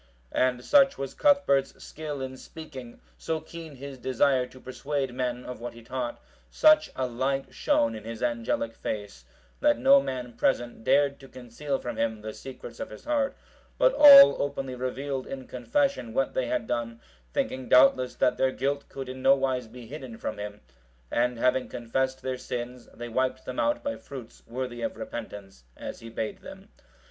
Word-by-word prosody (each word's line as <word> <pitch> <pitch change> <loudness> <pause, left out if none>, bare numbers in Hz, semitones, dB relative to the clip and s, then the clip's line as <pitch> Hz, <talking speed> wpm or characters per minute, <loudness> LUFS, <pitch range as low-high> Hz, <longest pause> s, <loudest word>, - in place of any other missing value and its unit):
And 125 -1 +1
such 275 -1 +5
was 135 -1 -4
Cuthbert's 280 - +3
skill 150 -3 -6
in 130 0 -5
speaking, 130 -4 -10 0.2
so 160 -1 -2
keen 160 -1 -10
his 135 0 -9
desire 130 0 +2
to 130 - -15
persuade 135 0 -3
men 125 -1 -2
of 125 - -7
what 120 0 -6
he 120 - -12
taught, 125 0 -4 0.3
such 310 0 +5
a 130 - -1
light 135 +3 -2
shone 115 -1 +2
in 110 -1 -7
his 115 +1 -6
angelic 115 -1 -1
face, 100 - -5 0.3
that 295 -1 +4
no 275 +1 +6
man 125 - -5
present 120 -3 0
dared 140 +1 +3
to 135 - -13
conceal 130 +3 -4
from 120 - -6
him 110 -2 -1
the 110 0 -6
secrets 135 -1 -10
of 280 - -5
his - - -12
heart, 290 -2 0 0.4
but - - +4
all 280 - +10
openly 135 -2 -3
revealed 130 +1 -3
in 130 -1 -6
confession 130 - -1
what 135 - +1
they 125 - 0
had - - -1
done, 115 -1 -3 0.3
thinking 130 - -2
doubtless 130 -1 +5
that 125 - +2
their 130 0 +2
guilt 140 +2 -2
could 135 -1 -6
in 130 0 -7
nowise 135 -2 +3
be 120 +1 -11
hidden 130 -2 -8
from 110 - -5
him; 105 0 -6 0.5
and 120 0 +1
having 125 +2 +1
confessed 130 +2 -2
their 130 -1 -3
sins, 125 0 -6
they 120 +1 -6
wiped 130 +2 -1
them 130 - -4
out 295 0 +1
by 285 0 -2
fruits 125 -4 -10
worthy 120 0 -4
of - - -3
repentance, 100 - -8
as - - -7
he 115 - -10
bade 110 -1 -4
them. - - -12
130 Hz, 175 wpm, -27 LUFS, 120-140 Hz, 0.5 s, all